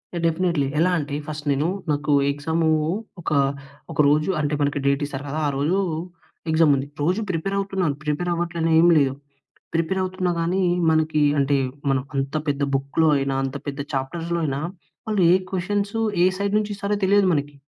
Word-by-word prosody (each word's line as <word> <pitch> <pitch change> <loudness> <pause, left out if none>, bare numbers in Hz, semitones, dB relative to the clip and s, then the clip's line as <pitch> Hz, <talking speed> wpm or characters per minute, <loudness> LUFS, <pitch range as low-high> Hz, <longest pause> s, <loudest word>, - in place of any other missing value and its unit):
ఎ - - -1
definitely. 165 -4 +1
ఎలా 180 +2 +3
అంటే 145 -2 -3
first 150 -1 -6
నేను 145 +4 +1 0.2
నాకు 145 +1 -1 0.2
ఎగ్జామ్ 160 +4 -2 0.6
ఒక - - -4 0.6
ఒక - - -8
రోజు 155 +4 +2
అంటే 150 0 0
మనకి 145 0 0
డేట్ 140 +1 +2
ఇస్తారు 140 -1 -6
కదా, 155 +3 -2
ఆ - - +1
రోజు 165 +8 +1 0.7
ఎగ్జామ్ 160 -2 +4
ఉంది. 135 +1 -3
రోజు 180 +8 +1
ప్రిపేర్ 185 +3 -2
అవుతున్నాను 190 -7 -1
ప్రిపేర్ 150 +4 -1
అవ్వట్లనేమి 170 0 +3
లేవు 135 -1 +1 0.6
ప్రిపేర్ 165 +4 0
అవుతున్నా 185 -1 -1
కానీ 180 +3 0 0.3
మనకి 155 -1 +2 0.2
అంటే 140 +1 +2 0.3
మనం 135 -1 +2
అంత 135 +2 -2
పెద్ద 140 0 -1
బుక్‌లో 140 +4 +1
అయినా 135 0 -1
అంత 135 +1 -3
పెద్ద 140 0 -4
చాప్టర్స్‌లో 165 +6 -2
అయినా 135 -2 -1 0.5
వాళ్ళు 210 -3 0
ఏ - - +7 0.2
క్వెషన్స్ 200 +3 -2 0.3
ఏ - - +6
సైడ్ 200 +1 -1
నుంచి 210 0 -2
ఇస్తారో 200 +1 -2
తెలియదు 200 0 +4
మనకి. 145 -1 -1
160 Hz, 165 wpm, -23 LUFS, 145-180 Hz, 0.7 s, ఏ